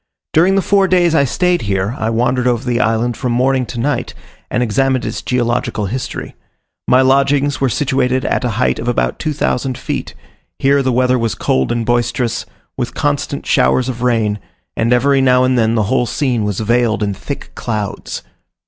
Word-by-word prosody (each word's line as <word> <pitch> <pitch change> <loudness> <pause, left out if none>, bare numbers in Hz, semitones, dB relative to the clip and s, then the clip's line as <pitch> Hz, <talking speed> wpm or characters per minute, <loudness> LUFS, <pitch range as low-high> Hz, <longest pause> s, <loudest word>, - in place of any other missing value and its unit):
During 180 +5 +4
the 195 - +2
four 195 -1 +3
days 175 -3 +3
I 140 -3 +4
stayed 180 +6 +1
here, 100 +1 -1
I 110 - -2
wandered 125 +2 +1
over 120 -1 +1
the 120 -1 0
island 115 +1 +1
from 125 +1 -2
morning 130 +1 +1
to 120 - -6
night, 145 +5 -2 0.3
and 125 - 0
examined 130 +3 +1
its - - -4
geological 120 -3 -1
history. 125 +6 -5 0.5
My 130 +1 +5
lodgings 140 +1 +2
were 135 - +2
situated 130 -1 0
at - - 0
a 125 - 0
height 125 - +1
of 120 - -5
about 120 - 0
2000 135 -4 -1
feet; - - -5 0.4
here 140 +1 +3
the 130 -1 0
weather 125 +1 +2
was 115 -2 -1
cold 65 0 0
and 120 -1 -1
boisterous, 120 0 -1 0.3
with 120 -2 -4
constant 145 -1 -2
showers 130 0 +2
of 120 -2 -5
rain; 110 -4 +1 0.4
and 115 +2 0
every 135 +3 +3
now 125 -1 +4
and 130 0 +2
then 115 -1 +2
the 110 - +2
whole 120 +3 +1
scene 120 -3 -1
was 105 0 -2
veiled 115 -1 +1
in 100 -1 -1
thick - - -7
clouds. 105 -4 -4
125 Hz, 185 wpm, -16 LUFS, 115-135 Hz, 0.5 s, My